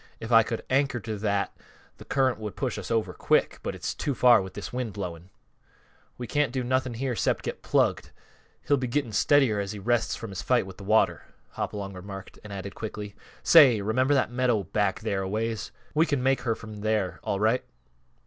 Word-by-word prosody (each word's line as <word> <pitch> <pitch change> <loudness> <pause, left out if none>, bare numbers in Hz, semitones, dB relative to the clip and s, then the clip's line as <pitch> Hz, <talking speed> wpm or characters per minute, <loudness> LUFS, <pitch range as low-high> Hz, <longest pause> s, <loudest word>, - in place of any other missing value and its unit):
If 115 - -6
I 115 -1 +8
could 115 +1 -4
anchor 135 -1 +1
to 110 +1 -4
that, 100 -1 -1 0.4
th' - - -13
current 130 -4 +2
would 105 -2 -6
push 130 -5 -2
us - - -7
over 115 -2 0
quick. - - +1
But - - -4
it's - - -3
too 140 - -2
far 120 -2 +6
with 95 -1 -8
this 105 - -6
wind 125 -4 -3
blowing." 90 -3 -6 0.9
"We 125 - -5
can't 145 0 +1
do 130 0 -2
nothing 130 -1 0
here 125 +1 -2
'cept - - 0
get - - -4
plugged. - - +1 0.6
He'll 145 - +4
be 130 -1 -2
getting 120 -1 -1
steadier 125 0 +4
as 100 0 -3
he - - -7
rests 115 +2 0
from 115 -3 -7
his 95 - -5
fight 125 -5 +2
with 95 -1 -10
th' - - -11
water," 100 -6 +2 0.3
Hopalong 100 -1 -4
remarked, 95 +1 -9
and 105 - -10
added 100 0 -6
quickly, 105 -2 -6 0.3
"Say, 135 -9 +7
remember 130 +7 +2
that 130 - +1
meadow 120 -4 +1
back 100 +2 -1
there 100 -3 -1
a 95 - -3
ways? 110 +1 -2 0.2
We 160 +2 +3
can 145 -4 0
make 135 -1 +2
her 115 -2 0
from 110 -1 -10
there, 105 -3 -1
all 100 - -1
right." 110 +4 +2
110 Hz, 205 wpm, -27 LUFS, 100-125 Hz, 0.9 s, I